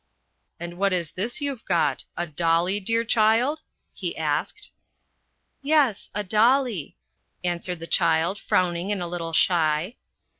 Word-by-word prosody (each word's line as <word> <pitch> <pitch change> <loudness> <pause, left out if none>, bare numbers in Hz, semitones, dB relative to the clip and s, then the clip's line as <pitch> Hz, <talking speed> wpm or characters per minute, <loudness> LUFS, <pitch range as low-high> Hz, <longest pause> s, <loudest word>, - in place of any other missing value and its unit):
" - - -50
And 175 +1 -7
what 200 -1 +2
is 170 -4 -1
this 230 +9 -4
you've 275 -5 -4
got 165 -7 +1
a 175 - -1
dolly, 170 +4 +1
dear 230 +3 0
child? 230 +6 +2 0.2
" - - -50
he - - -5
asked. - - -2 0.5
" - - -48 0.2
Yes, 280 -7 +2
a 210 - -1
dolly," 220 - +2 0.5
answered 175 0 -2
the 165 - -8
child, 170 +4 +2
frowning, 180 +1 0
and 195 -3 -2
a - - -4
little 170 -1 -5
shy. 165 +3 +2
185 Hz, 150 wpm, -24 LUFS, 170-225 Hz, 0.5 s, what